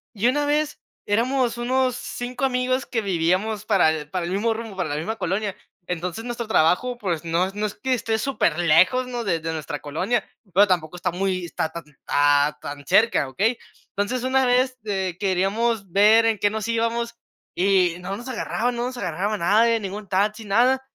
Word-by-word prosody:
y 215 Hz, +3 st, +2 dB
una 290 Hz, +4 st, +2 dB
vez 300 Hz, +1 st, 0 dB, 0.3 s
éramos 240 Hz, +3 st, +1 dB
unos 255 Hz, +1 st, +1 dB
5 245 Hz, +2 st, -4 dB
amigos 255 Hz, 0 st, 0 dB
que 230 Hz, -, -2 dB
vivíamos 195 Hz, +3 st, 0 dB
para 195 Hz, -7 st, +4 dB
el 150 Hz, -2 st, -5 dB
para 180 Hz, 0 st, -2 dB
el 175 Hz, -, -4 dB
mismo 225 Hz, +4 st, +1 dB
rumbo 220 Hz, -2 st, -7 dB
para 185 Hz, -, -2 dB
la 145 Hz, -, -2 dB
misma 170 Hz, +9 st, -3 dB
colonia, 195 Hz, +2 st, -2 dB, 0.3 s
entonces 180 Hz, +4 st, -4 dB
nuestro 235 Hz, -1 st, -4 dB
trabajo 220 Hz, +6 st, +2 dB
pues, 175 Hz, -8 st, -2 dB
no 165 Hz, +2 st, +1 dB
es 190 Hz, -, -6 dB
no 210 Hz, +1 st, -1 dB
es 210 Hz, -, -4 dB
que 260 Hz, -1 st, -1 dB
esté 225 Hz, -2 st, 0 dB
superlejos, 185 Hz, -, +2 dB
¿no?, 245 Hz, -1 st, -4 dB
de 175 Hz, -6 st, 0 dB
de 160 Hz, +1 st, -4 dB
nuestra 150 Hz, -2 st, -5 dB
colonia, 160 Hz, +11 st, -1 dB, 0.3 s
pero 205 Hz, +3 st, +6 dB
tampoco 175 Hz, -3 st, 0 dB
está 180 Hz, 0 st, -2 dB
muy 185 Hz, 0 st, -1 dB
está 160 Hz, -1 st, -3 dB
tan, 170 Hz, +1 st, -7 dB, 0.2 s
ah, 145 Hz, +1 st, +3 dB
tan 145 Hz, 0 st, -7 dB
cerca, 215 Hz, -5 st, +3 dB
¿okey? 220 Hz, -, 0 dB, 0.4 s
Entonces 205 Hz, +5 st, -1 dB
una 260 Hz, 0 st, +2 dB
vez, 255 Hz, +1 st, +2 dB
eh, 190 Hz, -4 st, -2 dB
queríamos 195 Hz, +2 st, 0 dB
ver 215 Hz, +4 st, +6 dB
en 225 Hz, -2 st, +1 dB
qué 205 Hz, -, +3 dB
nos 220 Hz, +1 st, -4 dB
íbamos, 230 Hz, 0 st, -1 dB, 0.4 s
y 185 Hz, -2 st, +2 dB
no 190 Hz, +2 st, -5 dB
nos 240 Hz, -, -9 dB
agarraban 245 Hz, -1 st, -2 dB
no 240 Hz, 0 st, -2 dB
nos 255 Hz, 0 st, -5 dB
agarraba 200 Hz, +1 st, -2 dB
nadie, 225 Hz, +6 st, +3 dB
ningún 200 Hz, +1 st, -6 dB
taxi, 210 Hz, +4 st, 0 dB
nada, 245 Hz, +6 st, +3 dB
205 Hz, 190 wpm, -23 LUFS, 180-240 Hz, 0.4 s, pero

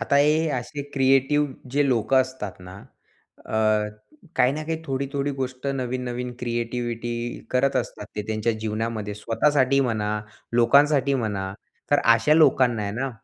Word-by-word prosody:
आता 140 Hz, -, +1 dB
हे 155 Hz, +3 st, +3 dB
असे 145 Hz, +4 st, -6 dB
क्रिएटिव्ह 135 Hz, +2 st, +3 dB, 0.2 s
जे 145 Hz, +2 st, +2 dB
लोकं 130 Hz, +2 st, +3 dB
असतात 130 Hz, -8 st, -5 dB
ना, 90 Hz, 0 st, -10 dB, 0.7 s
अ, -, -, -5 dB, 0.8 s
काही 125 Hz, +1 st, +4 dB
ना 155 Hz, +2 st, -4 dB
काही 160 Hz, 0 st, -3 dB
थोडी-थोडी 140 Hz, 0 st, -2 dB
गोष्ट 130 Hz, +1 st, -4 dB
नवीन-नवीन 125 Hz, 0 st, -3 dB
क्रिएटिव्हिटी 120 Hz, -1 st, -3 dB, 0.4 s
करत 135 Hz, +1 st, +2 dB
असतात 115 Hz, -4 st, -3 dB
ते 105 Hz, -, -1 dB
त्यांच्या 110 Hz, +1 st, 0 dB
जीवनामध्ये 110 Hz, -1 st, -3 dB
स्वतःसाठी 130 Hz, +5 st, +2 dB
म्हणा, 110 Hz, -5 st, 0 dB, 0.4 s
लोकांसाठी 140 Hz, +4 st, +4 dB
म्हणा. 100 Hz, -6 st, -2 dB, 0.4 s
तर 145 Hz, -, +5 dB, 0.2 s
अशा 150 Hz, +7 st, +3 dB
लोकांना 130 Hz, -7 st, +4 dB
आहे 100 Hz, 0 st, -3 dB
ना, 130 Hz, +4 st, -2 dB
125 Hz, 135 wpm, -24 LUFS, 115-140 Hz, 0.8 s, तर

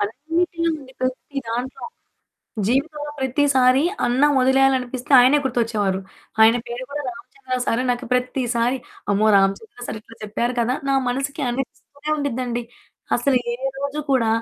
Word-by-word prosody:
అన్నిటిలో 330 Hz, -, -1 dB
అండి. 265 Hz, -2 st, -14 dB
ప్రతి 260 Hz, +2 st, -3 dB
దాంట్లో. 245 Hz, +3 st, -4 dB, 0.8 s
జీవితంలో 295 Hz, +4 st, -1 dB
ప్రతిసారి 265 Hz, -1 st, +3 dB, 0.2 s
అన్నం 270 Hz, +5 st, +3 dB
వదిలేయాలనిపిస్తే 260 Hz, -1 st, +2 dB
ఆయనే 265 Hz, +4 st, +5 dB
గుర్తొచ్చేవారు. 220 Hz, -6 st, 0 dB, 0.4 s
ఆయన 225 Hz, +2 st, +7 dB
పేరు 240 Hz, +2 st, -5 dB
కూడా 290 Hz, +1 st, -3 dB
రామచంద్ర 255 Hz, +2 st, -6 dB
సారు. 235 Hz, +2 st, +1 dB
నాకు 245 Hz, 0 st, -2 dB
ప్రతిసారి 250 Hz, -1 st, +1 dB, 0.4 s
అమ్మో! 205 Hz, +2 st, +3 dB
రామచంద్ర 195 Hz, -, 0 dB
సారు 220 Hz, -, -5 dB
ఇట్లా 230 Hz, -, -16 dB
చెప్పారు 235 Hz, +4 st, -1 dB
కదా! 245 Hz, +2 st, +1 dB
నా -, -, +3 dB, 0.2 s
మనసుకి 275 Hz, +3 st, -2 dB
అనిపిస్తూనే 280 Hz, +3 st, -6 dB
ఉండిద్దండి. 250 Hz, -4 st, -2 dB, 0.5 s
అసలు 255 Hz, +1 st, +2 dB
ఏ -, -, -1 dB, 0.2 s
రోజు 280 Hz, +2 st, -3 dB
కూడా 245 Hz, -4 st, +3 dB
255 Hz, 130 wpm, -22 LUFS, 240-280 Hz, 0.8 s, ఆయన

